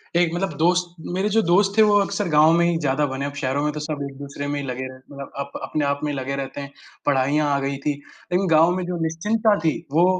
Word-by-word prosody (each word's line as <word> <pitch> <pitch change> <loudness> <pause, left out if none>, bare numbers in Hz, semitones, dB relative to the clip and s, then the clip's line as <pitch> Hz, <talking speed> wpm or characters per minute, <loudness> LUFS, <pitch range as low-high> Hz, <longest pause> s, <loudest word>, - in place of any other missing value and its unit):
एक 170 -1 +3
मतलब 175 -2 -2
दोस्त 175 +1 +1 0.2
मेरे 195 +3 0
जो 225 - +5
दोस्त 195 +4 +3
थे - - +7
वो 210 -1 +5
अक्सर 200 -1 -1
गाँव 155 +1 +6
में 170 0 +4
ही 170 -1 +2
ज़्यादा 145 0 +1
बने, 135 0 -3
अब 140 - -4
शहरों 140 +1 -1
में 150 - +1
तो 150 - -4
सब 150 -1 -4
एक-दूसरे 140 +1 -7
में 145 0 -2
ही 140 - -4
लगे 130 +1 -4
रहते 130 - -10
हैं 130 0 -17
मतलब 140 -1 -8
अप 140 0 -4
अपने 150 -2 -1
आप 140 0 0
में 150 - 0
ही 140 - -4
लगे 135 +1 -3
रहते 140 +1 -5
हैं। 140 0 -8 0.3
पढ़ाइयाँ 145 +2 +2
आ 140 - +1
गई 140 0 -2
थी, 150 - +3 0.4
इन 190 +2 +2
गाँव 165 +1 +5
में 185 - -2
जो 180 0 -3
निश्चिंतता 210 +7 +1
थी, 160 -1 +2 0.2
वो 170 +4 +4
150 Hz, 265 wpm, -23 LUFS, 140-175 Hz, 0.4 s, थे